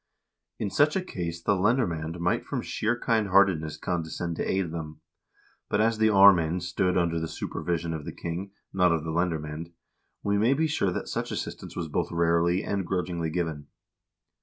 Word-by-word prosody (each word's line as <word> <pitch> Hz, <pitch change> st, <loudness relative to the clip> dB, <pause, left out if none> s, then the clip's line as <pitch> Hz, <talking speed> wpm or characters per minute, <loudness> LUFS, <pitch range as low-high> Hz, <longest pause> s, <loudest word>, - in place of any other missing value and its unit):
In 100 Hz, -3 st, -3 dB
such 150 Hz, +7 st, +3 dB
a 190 Hz, -, 0 dB
case 85 Hz, -, -5 dB
the -, -, +3 dB
lendermand 90 Hz, -6 st, 0 dB
might 85 Hz, +1 st, +1 dB
from -, -, -3 dB
sheer 115 Hz, +3 st, -1 dB
kind 110 Hz, -4 st, +1 dB
heartedness 90 Hz, -5 st, +3 dB
condescend 85 Hz, -1 st, -3 dB
to -, -, -1 dB
aid 95 Hz, -4 st, 0 dB
them; 80 Hz, -2 st, -6 dB, 0.7 s
but 105 Hz, -, +1 dB
as 110 Hz, 0 st, +2 dB
the 110 Hz, -, +5 dB
aarmamd 90 Hz, -4 st, +6 dB
stood 90 Hz, +1 st, 0 dB
under 85 Hz, -2 st, +1 dB
the 80 Hz, -, -3 dB
super -, -, -5 dB
vision 85 Hz, -1 st, -1 dB
of 80 Hz, -2 st, -5 dB
the -, -, -5 dB
king, 85 Hz, +4 st, -5 dB, 0.2 s
not 90 Hz, -2 st, +4 dB
of 80 Hz, -2 st, 0 dB
the 80 Hz, -, -3 dB
lendermcend, 80 Hz, -1 st, -2 dB, 0.5 s
we 100 Hz, 0 st, +1 dB
may 120 Hz, +6 st, +4 dB
be 160 Hz, +3 st, +2 dB
sure 150 Hz, -11 st, +1 dB
that -, -, -4 dB
such -, -, -3 dB
assistance -, -, -5 dB
was 85 Hz, -2 st, -3 dB
both 75 Hz, -, -2 dB
rarely 85 Hz, +3 st, +2 dB
and 100 Hz, -3 st, -2 dB
grudgingly 90 Hz, -3 st, -1 dB
given. 80 Hz, -4 st, -3 dB
85 Hz, 185 wpm, -27 LUFS, 85-100 Hz, 0.7 s, aarmamd